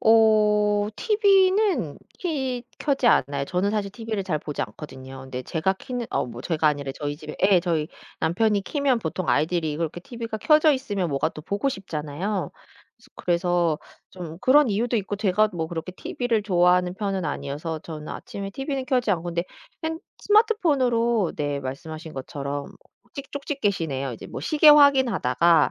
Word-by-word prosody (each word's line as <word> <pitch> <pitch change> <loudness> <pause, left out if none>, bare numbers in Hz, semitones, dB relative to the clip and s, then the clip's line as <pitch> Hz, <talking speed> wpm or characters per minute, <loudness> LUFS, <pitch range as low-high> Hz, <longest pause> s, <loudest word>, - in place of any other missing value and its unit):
어. 210 -2 +4
티비는 390 - +3 0.2
키 265 -8 -2
켜지 275 -4 0
않아요. 140 - +3
저는 185 +5 0
사실 210 -2 -1
티비를 215 -1 -4
잘 160 -5 -1
보지 150 0 -4
않거든요. 130 -3 -9
근데 130 -1 -6
제가 165 +8 0
켜는 245 +2 -5
어 - - 0
뭐 120 -1 -8
제가 155 +2 0
아니라 140 -2 -2
저희 145 +1 -4
집에 155 0 -9
예 190 -2 +5
저희 165 -3 -1 0.3
남편이 205 +4 +2
켜면 280 -3 +1
보통 175 -1 -4
아이들이 160 0 +1
이걸 165 +3 -1
이렇게 165 +2 -6
티비가 230 +2 -6
켜져 305 +4 +5
있으면 205 -10 -2
뭐가 140 +3 +1
또 155 - -10
보고 200 - -1
싶잖아요. 185 - -3 0.7
그래서 175 -2 +1 0.3
좀 170 -3 -8
그런 280 +4 +5
이유도 235 +4 0
있고 205 0 -2
제가 210 +1 +2
뭐 165 -2 -2
그렇게 170 +2 -5
티비를 230 +3 -2
좋아하는 180 -1 +3
편은 195 -3 -2
아니어서 155 +3 -4
저는 155 -2 -8
아침에 200 -5 -6
티비는 270 +3 -4
켜지 250 -5 +1
않고 175 -3 0
근데 170 0 -2 0.4
생 320 0 -2 0.2
스마트폰으로 260 - +2
네 145 -1 -2
말씀하신 155 +4 -7
것처럼 140 +1 -4
뭐 - - -15 0.4
찍 275 0 -8
쪽집게시네요. 200 - -2
뭐 125 - -4
이제 - - -10 0.2
시계 305 0 +5
확인하다가 235 - +5
195 Hz, 360 characters per minute, -24 LUFS, 160-245 Hz, 0.7 s, 예